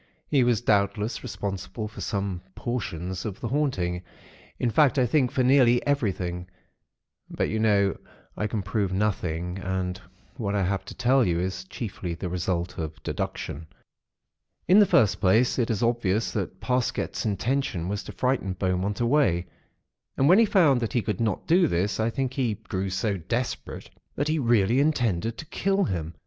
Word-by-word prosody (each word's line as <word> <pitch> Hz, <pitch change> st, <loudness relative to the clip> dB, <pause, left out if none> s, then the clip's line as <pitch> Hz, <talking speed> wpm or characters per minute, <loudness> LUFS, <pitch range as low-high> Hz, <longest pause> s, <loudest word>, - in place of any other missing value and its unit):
He 140 Hz, -4 st, +4 dB
was 120 Hz, -2 st, +2 dB
doubtless 105 Hz, 0 st, +1 dB
responsible 100 Hz, +2 st, -5 dB
for 110 Hz, -, -10 dB
some 100 Hz, -3 st, -2 dB
portions 95 Hz, -7 st, -4 dB
of 105 Hz, -4 st, -5 dB
the 115 Hz, -, -4 dB
'haunting'; 95 Hz, -11 st, 0 dB, 0.6 s
in 120 Hz, -, 0 dB
fact 145 Hz, +4 st, +4 dB
I 130 Hz, -, +4 dB
think 130 Hz, +1 st, +2 dB
for 130 Hz, -, +1 dB
nearly 125 Hz, -2 st, +4 dB
everything; 95 Hz, -10 st, -1 dB, 0.8 s
but, -, -, -1 dB
you 110 Hz, -, -1 dB
know, 100 Hz, -3 st, +3 dB, 0.4 s
I 105 Hz, -, -1 dB
can 105 Hz, -2 st, -3 dB
prove 100 Hz, 0 st, -1 dB
nothing, 90 Hz, -3 st, -1 dB
and 90 Hz, -1 st, -3 dB, 0.4 s
what 105 Hz, -3 st, -2 dB
I 100 Hz, -, +1 dB
have 95 Hz, +2 st, -1 dB
to -, -, -9 dB
tell 130 Hz, +2 st, +3 dB
you 85 Hz, -5 st, +1 dB
is 95 Hz, +1 st, -3 dB
chiefly 95 Hz, -3 st, -5 dB
the 90 Hz, +1 st, -4 dB
result 90 Hz, 0 st, -2 dB
of 80 Hz, -1 st, -6 dB
deduction. 80 Hz, +3 st, -4 dB, 1.0 s
"In 185 Hz, +5 st, +7 dB
the 205 Hz, -, +6 dB
first 105 Hz, -, +3 dB
place, 110 Hz, +7 st, +3 dB
it 120 Hz, -, +1 dB
is 115 Hz, -1 st, 0 dB
obvious 115 Hz, -3 st, +1 dB
that 95 Hz, -2 st, -4 dB
Parsket's 125 Hz, -1 st, -1 dB
intention 110 Hz, -3 st, -1 dB
was 100 Hz, +2 st, -2 dB
to -, -, -7 dB
frighten 125 Hz, -7 st, 0 dB
Beaumont 95 Hz, +3 st, -1 dB
away; 120 Hz, -, +2 dB, 0.7 s
and 135 Hz, -, +3 dB
when 185 Hz, +6 st, +7 dB
he 230 Hz, -, +6 dB
found 165 Hz, -, +4 dB
that 115 Hz, -, -2 dB
he 120 Hz, -, +1 dB
could 105 Hz, -4 st, -2 dB
not 110 Hz, -4 st, -1 dB
do 175 Hz, +1 st, +4 dB
this, 100 Hz, 0 st, 0 dB
I 110 Hz, +1 st, +2 dB
think 130 Hz, +1 st, -2 dB
he 125 Hz, -6 st, 0 dB
grew 95 Hz, 0 st, -4 dB
so 95 Hz, +2 st, -1 dB
desperate 120 Hz, +9 st, -4 dB, 0.2 s
that 145 Hz, +2 st, -1 dB
he 155 Hz, 0 st, +1 dB
really 115 Hz, -1 st, +3 dB
intended 115 Hz, -, +1 dB
to -, -, -7 dB
kill 195 Hz, +5 st, 0 dB
him. 85 Hz, -4 st, -3 dB
105 Hz, 170 wpm, -26 LUFS, 95-125 Hz, 1.0 s, In